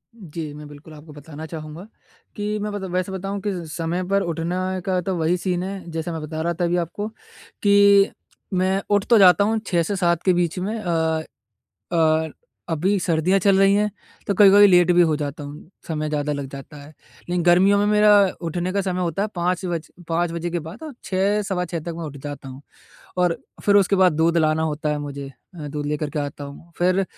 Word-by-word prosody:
जी, 160 -7 -7
मैं 150 0 -10
बिल्कुल 145 +2 -13
आपको 150 0 -13
बताना 150 +1 -9
चाहूँगा 160 +4 -8 0.5
कि 210 0 -2
मैं 210 +1 -3
मतलब 195 -3 -5
वैसे 185 +1 -1
बताऊँ 195 +1 -4
किस 175 -7 -4
समय 170 +2 -2
पर 200 0 +2
उठना 180 +3 -2
का 185 -1 +1
तो 190 +1 -2
वही 165 +3 +1
सीन 180 0 -2
है 190 -2 -6
जैसे 165 +1 -4
मैं 160 -1 -5
बता 155 +1 -5
रहा 170 +1 0
था 175 +1 -1
अभी 175 +1 +1
आपको 175 +5 -3 0.6
कि 200 0 +6 0.4
मैं 190 +1 +1
उठ 205 -1 +3
तो 230 - +7
जाता 190 +1 +7
हूँ 220 +1 +1
6 170 -3 +2
से 200 +5 -2
7 170 -2 +1
के 185 - +4
बीच 175 0 0
में 210 +5 -3
अ, 160 -4 0 0.7
और 160 -1 +2 0.4
अभी 185 +6 +1
सर्दियाँ 175 +3 +2
चल 195 0 +4
रही 195 0 +5
हैं 210 +1 +2 0.4
तो 200 - 0
कभी-कभी 205 +1 +8
लेट 180 -2 +5
भी 175 0 +5
हो 160 -2 +2
जाता 145 0 -5
हूँ। 150 +4 -10 0.2
समय 155 -1 -2
ज़्यादा 150 0 -1
लग 140 -1 -4
जाता 140 +2 -10
है 145 0 -11 0.4
लेकिन 175 -1 0
गर्मियों 185 +4 +5
में 205 - +2
मेरा 210 0 +4 0.4
उठने 175 +3 -2
का 200 - +1
समय 185 -1 -2
होता 175 +2 -1
है 215 - -1
5 180 +2 -1
बज 170 -3 -4 0.2
5 165 0 0
बजे 170 +1 -3
के 175 - -1
बाद 195 - -10
और 305 - -7
6 200 +2 +1
सवा 190 -3 -2
6 170 -1 -4
तक 170 +2 -6
मैं 170 - -5
उठ 145 -2 -7
जाता 140 -1 -8
हूँ। 130 +1 -10 0.6
और 180 -2 +2 0.3
फिर 205 0 +5
उसके 195 0 +3
बाद 185 -3 +5
दूध 165 +2 +2
लाना 155 0 +2
होता 155 -1 -2
है 150 - -1
मुझे 140 -1 -6 0.3
अ, 150 -3 -7
दूध 145 0 -4
लेकर 150 0 -2
के 150 - -4
आता 145 0 -4
हूँ 150 +4 -12
फिर 185 +2 +2
175 Hz, 215 wpm, -22 LUFS, 155-195 Hz, 0.7 s, कभी-कभी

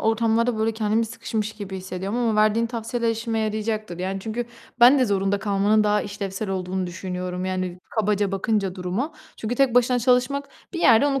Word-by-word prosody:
ortamlarda 225 +1 +1
böyle 225 +1 +1
kendimi 220 +1 0
sıkışmış 220 -1 -3
gibi 200 -3 -7
hissediyorum 190 +4 -4
ama 230 -3 +1
verdiğin 215 +2 +3
tavsiyeler 230 0 -2
işime 225 0 -2
yarayacaktır. 215 -3 -2
Yani, 190 +1 -3
çünkü 225 +3 -3 0.4
ben 255 +4 +8
de 255 - +4
zorunda 200 -2 +1
kalmanın 205 +1 +2
daha 210 0 +2
işlevsel 200 0 -5
olduğunu 185 0 -2
düşünüyorum, 180 0 -4
yani, 185 -1 -3
kabaca 210 -3 0
bakınca 195 -1 0
duruma. 190 - -3 0.2
Çünkü 225 +2 -3
tek 255 -2 +2
başına 245 0 +4
çalışmak, 255 +3 +1 0.2
bir 340 - -4
yerde 230 0 +6
onu 275 -2 +1
215 Hz, 170 wpm, -24 LUFS, 195-230 Hz, 0.4 s, ben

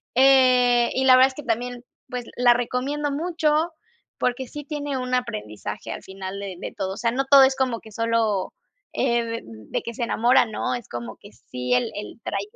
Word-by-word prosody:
Eh, 250 -2 +5
y 265 0 0
la 255 - +8
verdad 260 +1 +7
es - - -11
que 295 - -8
también, 245 0 -3 0.3
pues, 250 -1 -5
la 245 -1 +6
recomiendo 260 +5 -2
mucho 320 +1 0 0.5
porque 250 +1 -1
sí 295 -1 -8
tiene 290 -2 -3
un 255 0 -4
aprendizaje 105 - -4
al - - -9
final 190 0 -7
de 195 -2 -6
de - - -6
todo. 190 -2 -2
O - - -9
sea, 230 -1 0
no 270 +3 0
todo 275 0 +8
es 265 0 +4
como 255 -3 0
que 220 - -14
sólo, 225 -4 0 0.4
eh, 235 0 +1
de 230 0 -4
de 110 -2 -6
que 235 - -5
se 240 - -4
enamora, 240 +2 +3
¿no? 220 +2 -2
Es 245 -3 -8
como 120 -2 -6
que - - -15
sí 125 +3 -4
el 125 - +2
el 210 +3 -7
trayecto. 200 +1 -4
245 Hz, 205 wpm, -24 LUFS, 210-265 Hz, 0.5 s, la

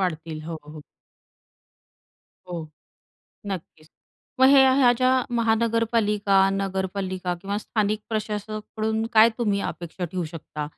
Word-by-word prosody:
वाढतील. 160 -3 -3
हो, 160 0 -6
हो. 150 0 -10 1.7
हो, 165 -3 -5 0.8
नक्कीच. 170 -5 -7 0.5
मग 260 - +8
हे, 275 -1 +7
ह्या 250 -3 +6
ज्या 255 +1 +2 0.3
महानगरपालिका, 225 -3 +2
नगरपालिका 190 -1 -2
किंवा 200 +2 -3
स्थानिक 215 0 -1
प्रशासकाकडून 215 0 -3
काय 220 0 +7
तुम्ही 205 -4 +1
अपेक्षा 175 +1 -7
ठेवू 175 +1 -3
शकता? 155 -2 -7
200 Hz, 105 wpm, -24 LUFS, 180-220 Hz, 1.7 s, मग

